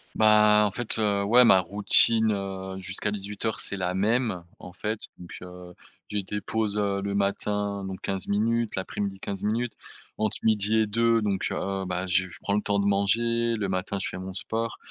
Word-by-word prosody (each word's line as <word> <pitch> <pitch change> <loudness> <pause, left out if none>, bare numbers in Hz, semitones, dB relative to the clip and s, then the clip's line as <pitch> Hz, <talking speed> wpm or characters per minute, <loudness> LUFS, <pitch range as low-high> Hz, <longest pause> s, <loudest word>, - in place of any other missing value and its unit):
Bah, 105 -1 +6
en - - 0
fait, 115 +2 -4
heu, 100 -2 +1
ouais 120 +5 +6
ma 95 -5 +6
routine, 110 +3 +4
heu, 95 -1 -5
jusqu'à 95 +2 -3
18:00 105 +2 -3
c'est 100 - -1
la 90 -1 -2
même. 110 -2 0 0.2
En 90 - -10
fait, 105 +4 -4 0.2
donc, 90 -1 -12
heu, 90 0 -11 0.3
j'ai 105 -1 -2
des 105 +2 -4
pauses, 105 +1 -2
heu, 100 -1 0
le 100 0 -3
matin 100 0 -1
donc 95 -1 -6
15 95 -1 -3
minutes, 115 +2 0
l'après-midi 95 +1 -3
15 100 -1 -5
minutes, 115 +3 -1 0.5
entre 110 0 0
midi 110 0 +2
et - - +2
deux 115 +1 +2
donc 100 -2 0
heu, 95 0 -2
bah 90 0 -2
j 95 +1 +1
je - - -11
prends 100 - -1
le 105 - +2
temps 100 -1 0
de 100 - +1
manger, 115 +4 +1
le 105 -3 -2
matin 95 +2 -2
je - - -2
fais - - -6
mon 95 0 -6
sport, 115 +4 -3
100 Hz, 195 wpm, -26 LUFS, 95-110 Hz, 0.5 s, Bah